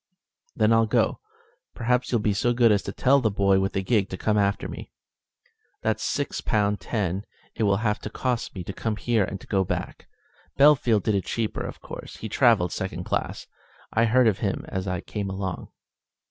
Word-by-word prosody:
"Then 110 0 +3
I'll 115 0 +4
go. 115 0 +1 0.6
Perhaps 125 +1 0
you'll 120 -3 +2
be 105 -1 +1
so 120 +4 +1
good 120 -2 +4
as 100 -1 +3
to 100 - -5
tell 135 +6 +3
the 110 - +2
boy 100 -1 +3
with 95 0 -1
the 95 - -1
gig 100 -1 +1
to 95 - -5
come 105 +2 0
after 100 -1 +1
me? - - -8 0.9
That's - - 0
six - - -2
pound 105 -1 +1
ten 100 -3 -2 0.3
it - - -6
will 100 -1 +3
have 105 -1 +1
cost 125 -3 -2
me 90 - -5
to 95 - -6
come 110 +2 -2
here 115 -1 +1
and 95 - -4
go 95 -1 +2
back. - - -5 0.5
Bellfield 135 -8 +5
did 110 - +1
it 100 -2 0
cheaper, 115 -2 -2
of - - -6
course; - - -9
he 110 - -6
travelled 105 -7 +3
second 95 - -4
class. - - -3 0.5
I 115 +1 +3
heard 120 +2 +4
of 105 - +2
him - - -2
as 95 0 -3
I 90 -1 -2
came 100 -2 -4
along." 95 -2 -4
105 Hz, 195 wpm, -25 LUFS, 95-115 Hz, 0.9 s, Bellfield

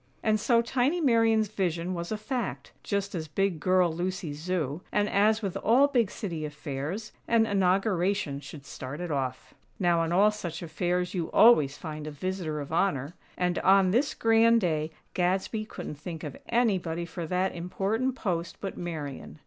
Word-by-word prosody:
And 215 -1 +2
so 230 +2 +3
tiny 260 +8 +1
Marian's 225 -6 +3
"vision" 180 -3 -1
was 170 +1 -4
a 215 - -1
fact; 245 +2 -4
just 200 -1 -2
as 160 -3 -4
"big 190 +2 0
girl" 180 0 +3
Lucy's 175 -3 -3
Zoo; 165 -3 -2
and, 205 0 +2
as 215 +2 +3
with 195 -2 -2
all 240 +7 +4
big 240 -7 +2
City 170 -8 -5
affairs, 150 +7 -5 0.2
an 230 -1 +4
Inauguration 195 -5 +1
should 140 0 -11
start 135 +3 -7
it 175 -2 -4
off. 130 -3 -3 0.2
Now, 175 -3 +2
on 165 0 0
all 200 +4 +5
such 175 -6 -6
affairs 175 +2 -1
you 170 -4 -2
always 155 - +6
find 155 -2 -6
a - - -4
"visitor 165 0 -3
of 145 +2 -7
honor"; 160 -5 0 0.2
and 180 0 0
on 190 -1 +5
this 275 +8 +1
grand 225 +1 +4
day 155 -4 0 0.2
Gadsby 190 +4 0
couldn't 150 -8 -7
think 160 0 -7
of 145 -3 -6
anybody 185 -8 +1
for 170 -1 -6
that 185 +2 0
important 200 +9 -1
post 170 -8 -3
but 195 - -5
Marian. 155 -5 -6
180 Hz, 170 wpm, -28 LUFS, 160-215 Hz, 0.2 s, always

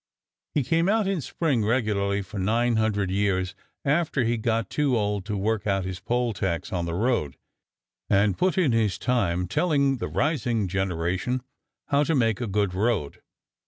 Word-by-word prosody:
He 145 - +2
came 165 +7 +2
out 215 0 +2
in 190 -4 0
spring 140 -5 0
regularly 105 -3 0
for 100 +1 -7
nine 115 +4 +1
hundred 105 -4 0
years 95 -2 0 0.3
after 145 -2 +1
he 115 +1 +1
got 115 -2 0
too 140 -5 +1
old 105 -2 -1
to 105 -1 -2
work 110 +2 -1
out 95 -2 +1
his 95 -1 -5
poll 120 +3 0
tax 90 +1 -2
on 85 -2 -1
the 85 - -2
road 105 - 0 0.7
and 100 -1 +3
put 185 - +1
in 170 -8 +3
his 110 -5 +1
time 90 -8 0
telling 140 - +2
the 120 - -3
rising 120 - 0
generation 95 +6 -1 0.5
how 140 +1 +3
to 165 - +1
make 115 -4 +1
a 120 - -1
good 100 -2 0
road. 100 -6 -1
110 Hz, 170 wpm, -25 LUFS, 95-125 Hz, 0.7 s, and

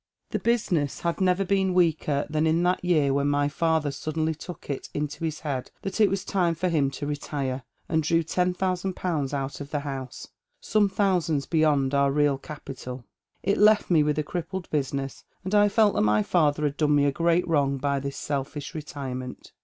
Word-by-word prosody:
" - - -54
The - - -1
business 180 - 0
had 170 +2 -1
never 185 +1 +2
been 190 -1 +1
weaker 155 -5 +2
than 155 +1 +1
in 165 +2 +2
that 180 +1 +1
year 155 -6 +3
when 140 +1 +1
my 145 0 +2
father 160 -1 +1
suddenly 155 +2 -2
took 170 +3 -10
it 140 -2 -4
into 150 +2 -3
his 160 -1 -3
head 135 -4 -3
that 195 +3 -2
it 205 - +6
was 195 0 -2
time 175 -5 +1
for 180 +3 -1
him 150 -5 +2
to 145 - -6
retire, 140 -2 -3 0.3
and 160 -1 +1
drew 165 +2 +2
ten 180 +2 0
thousand 185 0 -1
pounds 155 -7 -1
out 140 0 -3
of 140 - -7
the 145 -1 -2
house, 135 -3 -6 0.3
some 210 -1 +2
thousands 180 -8 +1
beyond 150 -4 +2
our 140 0 +3
real 145 -1 +2
capital. 130 -4 -8 0.4
It 200 - +1
left 210 -2 +5
me 160 -3 +5
with 150 0 +1
a 155 - +1
crippled 175 +3 -5
business, 140 -2 -2 0.2
and 190 +2 -4
I 205 0 +5
felt 210 0 +4
that - - +1
my 105 0 +3
father 150 - +2
had 145 -1 -1
done 150 -1 +3
me 145 0 +4
a 140 - +3
great 170 +4 +1
wrong 140 -4 +2
by 140 +1 0
this 140 0 -5
selfish 145 +2 -4
retirement. 135 -5 -6
155 Hz, 200 wpm, -26 LUFS, 140-180 Hz, 0.4 s, it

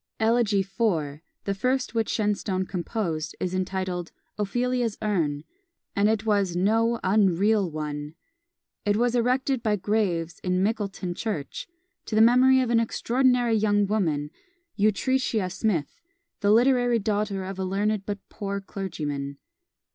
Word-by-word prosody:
Elegy 220 -3 +3
IV., 180 -8 -1 0.2
the 200 - -1
first 255 +7 -1
which 225 -2 0
Shenstone 205 -3 0
composed, 175 -3 -3
is 185 0 -2
entitled 185 -1 -2 0.2
"Ophelia's 240 +2 -1
Urn," 160 -9 -1 0.5
and 205 +1 +3
it 220 0 0
was 200 -5 +1
no 225 +5 +2
unreal 200 0 +3
one! 150 -1 -5 0.7
It 205 0 +1
was 240 +1 +2
erected 255 +2 +1
by 215 -2 +1
Graves 190 -4 -1
in 180 0 0
Mickleton 200 -4 -2
Church, 175 -8 -4 0.4
to 215 - -2
the - - +4
memory 255 +3 +6
of 245 -2 -1
an 230 - +4
extraordinary 245 +1 +2
young 205 -1 +3
woman, 160 -8 -1 0.4
Utrecia 215 -1 +1
Smith, 195 - -2 0.4
the 205 - +1
literary 245 +1 +4
daughter 205 -2 -1
of 190 0 -6
a - - -1
learned 200 +2 0
but 205 -1 -5
poor 200 -2 -4
clergyman. 150 -8 -5
205 Hz, 130 wpm, -26 LUFS, 185-225 Hz, 0.7 s, memory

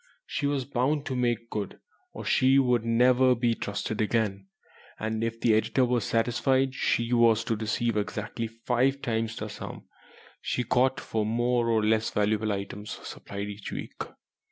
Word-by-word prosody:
She 145 - -2
was 140 -3 -1
bound 140 +3 0
to 130 - -3
"make 120 -2 -1
good" 105 -3 -4 0.3
or - - -8
she 130 +1 +4
would 125 -4 +3
never 125 +2 +4
be 120 0 +1
trusted 105 0 -3
again, 105 -3 0 0.5
and 110 +1 -2
if 115 0 -2
the 115 - +3
editor 120 +4 +2
were 125 -1 +1
satisfied 130 +5 +1
she 120 -2 0
was 115 -2 +4
to 115 -1 -1
receive 110 +1 -1
exactly 105 +2 -3
five 125 +4 0
times 115 -2 -1
the 110 - -4
sum 105 - -8 0.6
she 125 - -1
got 130 +3 +2
for 110 -1 -2
more 120 +2 +1
or 110 -2 +2
less 110 +1 +2
valuable 105 +1 +1
items 100 +1 -5
supplied 100 0 -6
each 100 0 -7
week. - - -6
115 Hz, 160 wpm, -28 LUFS, 110-125 Hz, 0.6 s, she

